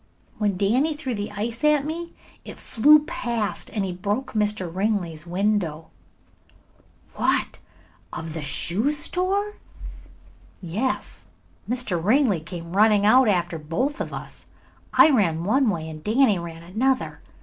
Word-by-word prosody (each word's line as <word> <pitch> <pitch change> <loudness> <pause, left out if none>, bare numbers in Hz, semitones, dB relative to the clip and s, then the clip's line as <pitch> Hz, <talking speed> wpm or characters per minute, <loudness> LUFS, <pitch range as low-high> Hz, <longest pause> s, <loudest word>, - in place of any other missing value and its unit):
"When 205 -3 0
Danny 250 - +1
threw 280 -4 -4
the 205 -1 -4
ice 225 +5 -4
at 300 -2 +3
me 335 +2 -5 0.3
it - - -9
flew 300 +6 +4
past 230 -7 -3
and 190 -4 -4
broke 210 +7 -2
Mr. 210 -3 0
Ringley's 175 -3 -2
window." 180 -4 -1 1.3
"What, - - 0 0.5
of 160 -1 -6
the 160 - -4
shoe 180 - 0
store?" 375 +7 -1 1.0
"Yes. 200 +9 -3 0.4
Mr. 230 -9 -1
Ringley 225 - +3
came 170 +2 -8
running 210 0 +4
out 255 +3 +6
after 175 -4 0
both 240 - -2
of - - -4
us. - - -8 0.4
I 315 - +6
ran 170 - +2
one 250 +6 +2
way 160 -5 -3
and 155 -1 -9
Danny 220 -2 +3
ran 165 -1 -8
another. 250 +9 -1
210 Hz, 130 wpm, -24 LUFS, 175-260 Hz, 1.3 s, out